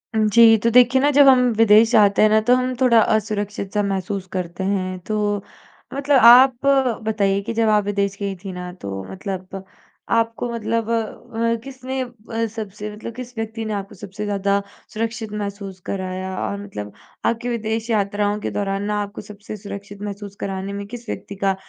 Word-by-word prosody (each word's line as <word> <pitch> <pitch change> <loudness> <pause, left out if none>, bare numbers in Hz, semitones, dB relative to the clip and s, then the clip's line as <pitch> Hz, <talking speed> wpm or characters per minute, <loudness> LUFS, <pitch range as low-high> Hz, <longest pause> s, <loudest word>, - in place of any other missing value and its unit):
जी, 225 +1 +6
तो 230 +2 +1
देखिए 250 +2 +5
ना 290 - +4
जब 285 0 +6
हम 260 -1 +7 0.2
विदेश 225 0 +6
जाते 210 -3 +5
हैं 215 - +6
ना 215 +1 +5
तो 250 - +6
हम 255 0 0
थोड़ा 240 -3 +6
असुरक्षित 205 -2 -1
सा 210 - +2
महसूस 195 -1 -3
करते 180 0 -4
हैं। 185 -1 -1
तो 205 -2 -1 0.5
मतलब 280 0 +2
आप 250 +2 +7 0.4
बताइए 200 -2 +1
कि 230 - -4
जब 225 -1 +2
आप 210 -1 +3
विदेश 200 -1 -1
गईं 200 -1 -3
थीं 195 -2 -6
ना 180 0 -6
तो 95 -1 -5
मतलब 190 - -6 0.5
आपको 230 +1 0
मतलब 230 0 -2
अ, 230 0 -1
किसने 265 0 -6
अ, 230 -2 -4
सबसे 210 -1 -6
मतलब 225 +2 -8
किस 250 -1 -9
व्यक्ति 225 0 -4
ने 215 - -3
आपको 200 -1 -5
सबसे 205 +2 -7
ज़्यादा 200 0 0 0.3
सुरक्षित 225 0 -3
महसूस 200 -2 -5
कराया? 185 -1 -4
और 200 - -3
मतलब 105 - -7 0.3
आपकी 235 +1 0
विदेश 225 0 -2
यात्राओं 205 -1 0
के - - -4
दौरान 195 -1 -2
ना 210 0 -1
आपको 205 0 -8
सबसे 210 +1 -9
सुरक्षित 200 0 -9
महसूस 200 -1 -6
कराने 195 0 -4
में 200 0 -5
किस 240 +2 -9
व्यक्ति 200 - -6
का 195 0 0
210 Hz, 175 wpm, -21 LUFS, 200-230 Hz, 0.5 s, हम